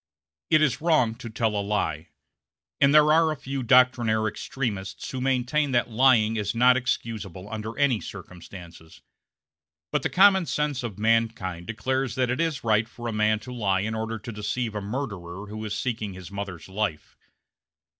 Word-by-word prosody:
It 155 -1 +5
is 145 -2 +1
wrong 150 -9 +3
to 115 - -7
tell 110 -1 -1
a 100 - 0
lie, 90 -6 -2 0.7
and 140 0 +5
there 150 0 +6
are 160 0 +4
a - - -2
few 135 -1 -5
doctrinaire 120 -3 +3
extremists 105 -4 -4
who 130 - -4
maintain 135 +2 +1
that 120 0 +1
lying 115 -2 +4
is 105 +1 -2
not 125 +2 +5
excusable 110 -7 -3
under 110 +1 -6
any 135 -6 +2
circumstances; 85 -3 -11 0.9
but 150 - +1
the - - -1
common 190 -2 +5
sense 150 -3 -1
of 115 -5 -6
mankind 110 -6 0
declares 130 +3 -2
that 125 -1 +1
it 130 +5 -1
is 160 -3 -1
right 110 0 +2
for 120 0 -8
a 115 - -3
man 105 0 +2
to 125 - -8
lie 100 -5 0
in 110 +2 -2
order 110 0 -3
to 110 +2 -8
deceive 110 +2 -3
a 105 - -3
murderer 100 -5 -5
who 110 +1 -7
is 105 -1 -3
seeking 110 -6 -3
his 95 0 -10
mother's 100 -4 -6
life. 95 -5 -3
115 Hz, 175 wpm, -25 LUFS, 105-130 Hz, 0.9 s, there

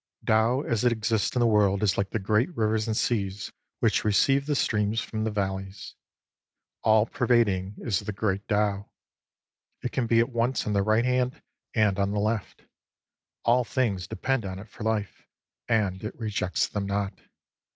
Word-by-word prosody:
Tao 110 +5 +3
as 115 -6 -1
it 125 - +4
exists 110 -1 0
in 125 - +2
the - - +4
world 105 -2 +3
is 95 -3 +3
like 100 0 -1
the - - -2
great 105 - +1
rivers 110 0 +1
and 110 -1 -1
seas 100 -4 -1 0.3
which - - +2
receive 135 +7 +3
the 150 - +1
streams 105 -3 +1
from 110 0 -4
the 110 - 0
valleys. 95 -1 -4 0.9
All 110 0 +4
pervading 115 -6 +1
is 105 -5 -1
the 105 0 -5
Great 100 0 -2
Tao. 105 -1 0 0.9
It 125 - -2
can 125 -3 -1
be 115 - +3
at 115 - +2
once 120 +2 0
on 105 - -1
the 100 - +2
right 110 +4 +2
hand 125 +2 0 0.4
and 105 -4 +2
on 100 0 +1
the 105 - 0
left. 105 0 -2 0.8
All 125 +2 +4
things 110 -7 -1
depend 120 +4 -1
on 95 -1 -5
it 105 +3 -10
for 110 - -9
life, 110 -2 -2 0.4
and 105 -5 0
it 105 - -6
rejects 105 -5 -1
them 100 -1 -3
not. 100 0 -2
110 Hz, 175 wpm, -27 LUFS, 100-115 Hz, 0.9 s, it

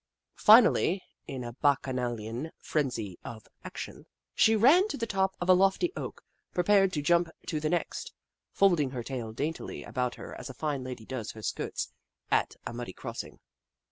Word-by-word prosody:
Fi 220 +3 +9
nally, 190 -4 +1 0.2
in 135 -4 -5
a 120 0 -6
bacchanalian 125 -2 -1
frenzy 115 - -2
of 110 -2 -9 0.2
action, - - -8 0.3
she 220 - +5
ran 290 - +6
to - - -4
the 230 - -1
top 190 -3 0
of 175 - -3
a 185 - +8
lofty 195 - +3
oak - - -6 0.3
and - - -37
prepared 195 +1 +4
to 150 - -1
jump 170 +2 +3 0.2
to 155 - -2
the 155 0 -1
next, 175 +1 -2 0.4
folding 175 -8 +3
her 125 -2 -5
tail 120 -3 -4
daintily 150 +8 -4
about 125 -2 -2
her - - -9
as - - -7
a 130 - -8
fine 145 -4 -2
lady 125 -3 -7
does 125 -3 -5
her 110 - -11
skirts - - -3 0.4
at - - +2
a - - -5
muddy 120 -5 -6
crossing. - - -7
145 Hz, 175 wpm, -29 LUFS, 125-190 Hz, 0.4 s, Fi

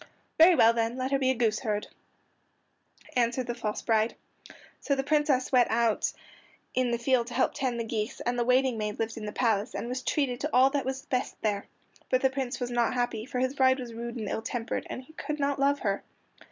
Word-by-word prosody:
"Very 340 +2 +8
well; 230 -5 +6
then 230 +1 -1
let 260 +1 -2
her 275 - +2
be 260 -1 +2
a 260 - +2
goose 225 -2 +1
herd," 210 -3 -2 1.3
answered 245 +1 +1
the 240 - -2
false 220 -3 -4
bride. 220 0 +2 0.6
So 280 - 0
the 270 - -1
Princess 290 -3 +1
went 250 -2 +4
out 230 -1 +1 0.6
in 255 -1 +1
the 235 - 0
field 240 0 +1
to 245 - -7
help 260 - +2
tend 250 -3 -2
the - - 0
geese, 220 -1 -3
and 245 0 -1
the - - +3
waiting 250 -1 +2
maid 210 -1 -3
lived 225 0 -2
in 215 -2 -6
the - - -3
palace, 220 -1 0
and - - -3
was 255 +1 -3
treated 260 -3 0
to 300 - -2
all 260 +2 +5
that 285 -1 -1
was 265 0 -4
best 255 0 -2
there. 205 -2 -1 0.4
But 255 - +2
the 265 - +3
Prince 265 -2 -3
was 245 -1 -3
not 240 0 +1
happy, 245 -2 -1
for 260 - -4
his 260 +1 +1
bride 260 -1 +3
was 240 -2 -6
rude 235 +1 -5
and 220 -4 -4
ill 220 - -2
tempered, 230 0 -3
and 255 - -6
he 315 - -18
could 300 -1 -4
not 280 -1 0
love 280 +1 +2
her. 200 -4 0
245 Hz, 230 wpm, -28 LUFS, 230-265 Hz, 1.3 s, Very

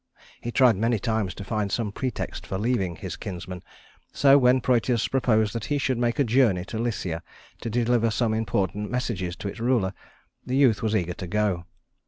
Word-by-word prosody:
He 120 - -4
tried 120 -4 +5
many 115 +2 +1
times 110 -4 -1
to 100 - -7
find 105 -1 -2
some 110 0 -1
pretext 125 +2 -4
for 95 - -3
leaving 100 -5 0
his - - -6
kinsman; 90 -1 -7 0.5
so 140 -1 +5
when 130 -1 +5
Prœtus 120 -1 +1
proposed 110 -5 +2
that 115 -2 -3
he 145 - 0
should 130 -3 0
make 120 -1 +1
a 140 - +4
journey 115 -7 +3
to 110 +3 -5
Lycia 95 -8 -2 0.4
to 115 - -3
deliver 120 0 +2
some 110 0 0
important 105 -1 -1
messages 95 -8 -2
to - - -6
its 100 - -6
ruler, 115 -5 +1 0.5
the 130 +1 -1
youth 130 -7 +4
was 110 -1 0
eager 90 -4 0
to 90 - -7
go. 100 -3 0
110 Hz, 190 wpm, -25 LUFS, 100-125 Hz, 0.5 s, tried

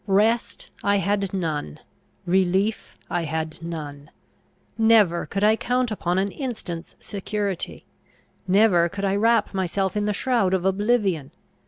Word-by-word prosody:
Rest 215 +4 +1
I 200 - +3
had 200 -1 0
none; 155 - -3 0.5
relief 190 +4 +1
I 175 -1 -1
had 160 +1 -4
none: 150 -3 -7 0.7
never 220 -6 +4
could 200 0 -2
I 215 +1 +5
count 245 +1 0
upon 180 -4 -1
an 195 +1 0
instant's 215 - -6
security; 200 -2 -4 0.6
never 185 -3 +4
could 200 +3 -4
I 195 0 +1
wrap 225 +1 +2
myself 190 +1 -1
in 210 0 0
the 210 - 0
shroud 225 -5 +1
of 185 -1 -2
oblivion. 195 - +1
195 Hz, 135 wpm, -24 LUFS, 175-210 Hz, 0.7 s, I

